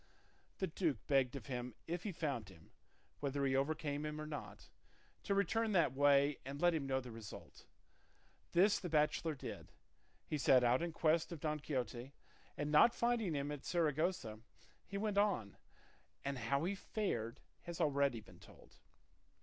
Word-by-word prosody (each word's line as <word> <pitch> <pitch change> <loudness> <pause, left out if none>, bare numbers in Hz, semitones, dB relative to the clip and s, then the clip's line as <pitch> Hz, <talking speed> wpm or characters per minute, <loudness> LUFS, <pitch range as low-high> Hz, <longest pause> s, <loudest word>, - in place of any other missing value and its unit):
The 190 - 0
duke 165 -3 0
begged 135 -2 +2
of 135 - -6
him 125 -3 -4
if 170 +1 -3
he 205 - -3
found 140 - -3
him 80 -4 -17 0.5
(whether 140 0 -1
he 135 -1 +2
overcame 145 +1 0
him 150 0 -4
or 155 - -4
not) 125 -10 -7 0.5
to 200 - 0
return 215 +3 +1
that 165 -8 +4
way 140 +1 +4
and 140 +2 -6
let 175 +1 +4
him 150 -4 -1
know 130 0 +1
the 125 -2 -8
result. 110 -3 -10 0.9
This 195 +4 +5
the 180 - -5
bachelor 155 +1 +2
did; - - -8 0.5
he 150 - -2
set 130 -2 +6
out 120 +1 +4
in 170 0 -1
quest 160 +1 +2
of 170 - -5
Don 150 0 -1
Quixote, 130 -2 -3 0.4
and 145 0 -2
not 155 +10 +6
finding 235 -8 +1
him 140 +1 -2
at 145 -2 -6
Saragossa, 160 -8 0 0.5
he 200 - -4
went 205 -1 +1
on, 185 - +1 0.7
and 140 -1 -2
how 140 +5 0
he 185 +4 0
fared 155 - -3 0.3
has 170 -1 -5
been - - +3
already 140 -6 +1
told. - - -17
145 Hz, 165 wpm, -37 LUFS, 130-170 Hz, 0.9 s, set